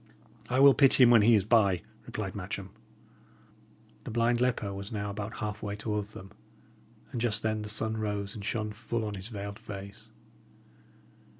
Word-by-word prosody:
"I 130 Hz, +1 st, +1 dB
will 140 Hz, 0 st, +9 dB
pity 135 Hz, -1 st, +6 dB
him 120 Hz, -, +7 dB
when 115 Hz, -2 st, +7 dB
he 115 Hz, +2 st, +6 dB
is 100 Hz, -2 st, +2 dB
by," 100 Hz, -6 st, +3 dB, 0.2 s
replied -, -, -4 dB
Matcham. -, -, -6 dB, 1.3 s
The -, -, -7 dB
blind 120 Hz, +1 st, +1 dB
leper 115 Hz, -5 st, 0 dB
was 100 Hz, +1 st, -7 dB
now 105 Hz, -2 st, -3 dB
about 105 Hz, +2 st, -5 dB
halfway 105 Hz, -1 st, -4 dB
towards 105 Hz, 0 st, -3 dB
them, 95 Hz, +1 st, -10 dB, 0.8 s
and 120 Hz, -, -3 dB
just 115 Hz, -4 st, 0 dB
then 110 Hz, -1 st, 0 dB
the 105 Hz, -, -6 dB
sun 110 Hz, +1 st, -1 dB
rose 105 Hz, -2 st, -2 dB
and 105 Hz, -, -8 dB
shone 105 Hz, 0 st, -2 dB
full 115 Hz, +1 st, -3 dB
on 105 Hz, -, -4 dB
his 95 Hz, 0 st, -7 dB
veiled 100 Hz, -2 st, -6 dB
face. 100 Hz, +2 st, -9 dB
105 Hz, 170 wpm, -29 LUFS, 100-115 Hz, 1.3 s, will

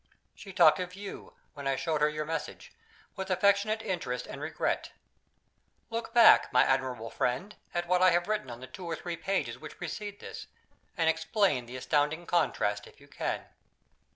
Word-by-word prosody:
She 195 Hz, -, -11 dB
talked 170 Hz, -4 st, +6 dB
of 180 Hz, 0 st, -4 dB
you, 200 Hz, 0 st, -9 dB, 0.2 s
when 140 Hz, -1 st, -6 dB
I 135 Hz, -, +2 dB
showed 155 Hz, +1 st, -1 dB
her 150 Hz, -, +5 dB
your 150 Hz, 0 st, -3 dB
message, 165 Hz, +1 st, -5 dB, 0.4 s
with 190 Hz, -1 st, -5 dB
affectionate 200 Hz, +4 st, +2 dB
interest 160 Hz, -, -3 dB
and 140 Hz, -, -8 dB
regret. 155 Hz, +2 st, -2 dB, 1.0 s
Look 230 Hz, 0 st, -3 dB
back, 235 Hz, -2 st, +7 dB
my 125 Hz, -, +6 dB
admirable 130 Hz, -4 st, 0 dB
friend, 175 Hz, +12 st, -1 dB, 0.2 s
at 175 Hz, 0 st, -1 dB
what 180 Hz, +1 st, +3 dB
I 185 Hz, -, +7 dB
have 175 Hz, 0 st, +2 dB
written 215 Hz, -11 st, -1 dB
on 120 Hz, 0 st, -8 dB
the -, -, -6 dB
two 170 Hz, +8 st, -9 dB
or 165 Hz, -, -1 dB
three 170 Hz, +1 st, -5 dB
pages 195 Hz, +3 st, -2 dB
which -, -, -10 dB
precede 205 Hz, -1 st, -6 dB
this, -, -, -8 dB, 0.5 s
and 165 Hz, -2 st, +2 dB
explain 160 Hz, -, +1 dB
the 125 Hz, +2 st, -7 dB
astounding 150 Hz, +5 st, 0 dB
contrast 105 Hz, -12 st, 0 dB
if -, -, -18 dB
you 140 Hz, -, -17 dB
can. -, -, -3 dB
165 Hz, 180 wpm, -30 LUFS, 140-190 Hz, 1.0 s, back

